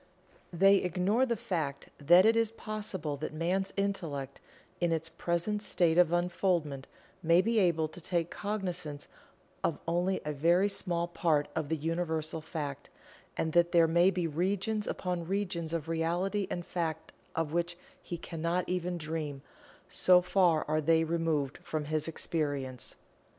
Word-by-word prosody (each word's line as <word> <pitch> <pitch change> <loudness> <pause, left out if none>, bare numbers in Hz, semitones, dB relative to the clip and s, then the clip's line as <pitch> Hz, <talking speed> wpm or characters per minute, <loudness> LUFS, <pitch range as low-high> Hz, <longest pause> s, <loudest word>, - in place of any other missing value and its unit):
They 195 +3 +5
ignore 190 +8 +1
the 235 - +1
fact 155 -9 -3
that 175 +6 +6
it 225 +1 +5
is 230 -1 +3
possible 210 -9 -5
that 155 +2 -5
Man's 185 +4 0
Intellect, 165 -9 -3 0.4
in 175 -1 +1
its 165 0 -1
present 170 +6 -1
state 175 -4 +2
of 175 -2 +5
unfoldment, 175 -5 0 0.3
may 170 +1 +5
be 225 +4 +2
able 170 -5 +2
to 175 - -10
take 170 0 -1
cognizance 180 -8 -4 0.6
of - - +1
only 175 +3 +1
a 150 - -2
very 170 +7 +3
small 175 -4 -2
part 160 -4 +1
of 155 -3 -2
the 160 - +1
Universal 160 0 -2
Fact, 145 -3 -5 0.5
and 160 -1 -1
that 175 0 +3
there 165 -1 +6
may 170 +3 +5
be 180 -2 -1
regions 195 +6 -1
upon 180 -2 -3
regions 180 -4 -2
of 165 -2 -3
Reality 175 +5 0
and 175 -1 -4
Fact 160 -3 -3 0.2
of 160 -2 -1
which 170 0 -1 0.2
he 175 - -5
cannot 170 +2 -2
even 180 -1 -1
dream, 150 -3 -4 0.4
so 180 -1 +5
far 180 -3 +2
are 155 +1 +1
they 160 +1 +3
removed 160 -4 -1
from 155 -2 -3
his 155 +1 0
experience. 145 -6 -3
170 Hz, 150 wpm, -31 LUFS, 155-185 Hz, 0.6 s, that